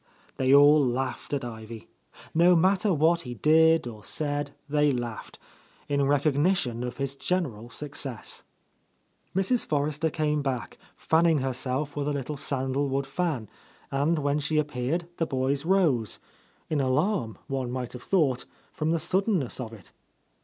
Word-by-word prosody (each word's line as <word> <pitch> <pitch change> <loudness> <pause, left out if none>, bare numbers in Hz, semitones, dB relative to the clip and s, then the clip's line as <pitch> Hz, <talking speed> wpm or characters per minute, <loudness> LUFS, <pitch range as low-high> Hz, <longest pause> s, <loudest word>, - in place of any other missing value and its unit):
They 130 0 +2
all 145 +1 +7
laughed 130 +1 -2
at 140 -3 -1
Ivy. 110 -1 -8 0.5
No 175 +2 +5
matter 190 +4 +3
what 165 +1 +3
he 125 -4 -7
did 160 +4 +4
or 110 -4 -8
said, 145 +1 -1 0.2
they 150 0 +3
laughed, 120 -3 -5 0.3
— - - -31
in 140 -1 +1
recognition 145 -3 +1
of 125 0 -5
his 140 0 -2
general 135 - -2
success. 135 -2 -4 0.9
Mrs. 195 +6 +2
Forrester 150 +2 0
came 150 -1 0
back, 130 -8 -3 0.2
fanning 165 0 +3
herself 130 +2 -2
with 145 -1 -2
a 150 - 0
little 140 +1 -3
sandalwood 135 0 -1
fan, 135 -5 -2 0.4
and 145 +5 +1
when 145 0 0
she 150 +2 -1
appeared 150 +3 -1
the 165 - 0
boys 135 +2 -1
rose, 165 - +2 0.3
— - - -36
in 150 -2 +2
alarm, 135 - 0
one 135 -2 -3
might 125 -1 -4
have 125 - -8
thought, 145 -10 +1 0.3
from 155 - -2
the 165 - +2
suddenness 185 - 0
of 120 -3 -5
it. 105 -5 -13
145 Hz, 150 wpm, -27 LUFS, 130-160 Hz, 0.9 s, all